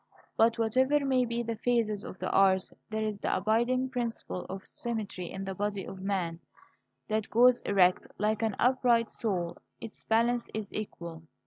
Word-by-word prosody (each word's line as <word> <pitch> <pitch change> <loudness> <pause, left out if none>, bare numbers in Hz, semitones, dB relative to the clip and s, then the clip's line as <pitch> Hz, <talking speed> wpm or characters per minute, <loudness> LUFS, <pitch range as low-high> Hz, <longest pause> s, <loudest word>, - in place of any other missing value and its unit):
But 225 +1 +4
whatever 260 +6 +2
may 260 -2 +3
be 235 0 -2
the 230 0 -3
phases 220 -3 0
of - - -8
the 185 - -3
arts, 190 -1 +3 0.2
there 220 0 -2
is 215 -2 -2
the - - 0
abiding 240 +6 +1
principle 235 -7 -3
of 190 0 -6
symmetry 215 -7 -4
in 195 - -5
the 195 0 -4
body 200 0 -2
of 190 - -8
man, 185 -4 -2 0.7
that 215 0 -1
goes 245 +2 +5
erect, 185 -2 +4
like 215 +1 0
an 220 -3 0
upright 245 -2 +3
soul. 175 -6 -2 0.2
Its 225 - -10
balance 235 +2 +1
is 215 -2 -5
equal. 170 -6 -6
220 Hz, 165 wpm, -30 LUFS, 195-235 Hz, 0.7 s, goes